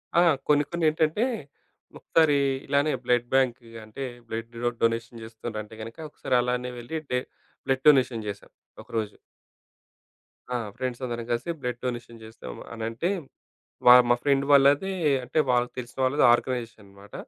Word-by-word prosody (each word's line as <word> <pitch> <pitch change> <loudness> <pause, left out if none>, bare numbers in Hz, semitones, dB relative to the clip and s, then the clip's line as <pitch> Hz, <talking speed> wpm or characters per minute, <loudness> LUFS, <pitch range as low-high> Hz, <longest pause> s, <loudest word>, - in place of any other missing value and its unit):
ఆ! 170 - +6 0.3
కొన్ని 145 -1 +4
కొన్ని 170 -1 -1
ఏంటంటే 160 +7 +1 0.7
ఒకసారి 155 -3 +3 0.3
ఇలానే 140 +2 +2
బ్లడ్ 120 -1 +2
బ్యాంకు 130 -3 +1 0.2
అంటే 110 +5 -7 0.2
బ్లడ్ 115 +1 -5
డొ-డొనేషన్ 115 0 -1
చేస్తుండ్రంటే 110 -1 -7
గనుక 115 +1 -8
ఒకసారి 130 - -2
అలానే 125 0 -2
వెళ్ళి 155 +7 -5
డే 125 - +2 0.5
బ్లడ్ 130 0 0
డొనేషన్ 125 -6 +3
చేశాం. 100 -1 -7 0.3
ఒకరోజు. 110 -2 -4 1.4
ఆ! - - +2 0.2
ఫ్రెండ్స్ 125 -1 -4
అందరం 120 -1 -4
కలిసి 120 +9 -1
బ్లడ్ 125 -1 -3
డొనేషన్ 120 -2 -5
చేసామనంటే. 115 - -5 0.8
వా 125 - +11 0.2
మా - - +7
ఫ్రెండ్ 140 -1 +2
వాళ్ళదే 145 +7 +5 0.3
అంటే 130 - -2
వాళ్ళకి 125 0 +1
తెలిసిన 125 +1 -8
వాళ్ళది 135 +3 +2
ఆర్గనైజేషన్‌ 120 -3 -2
అనమాట. 100 +1 -16
125 Hz, 130 wpm, -26 LUFS, 115-140 Hz, 1.4 s, వా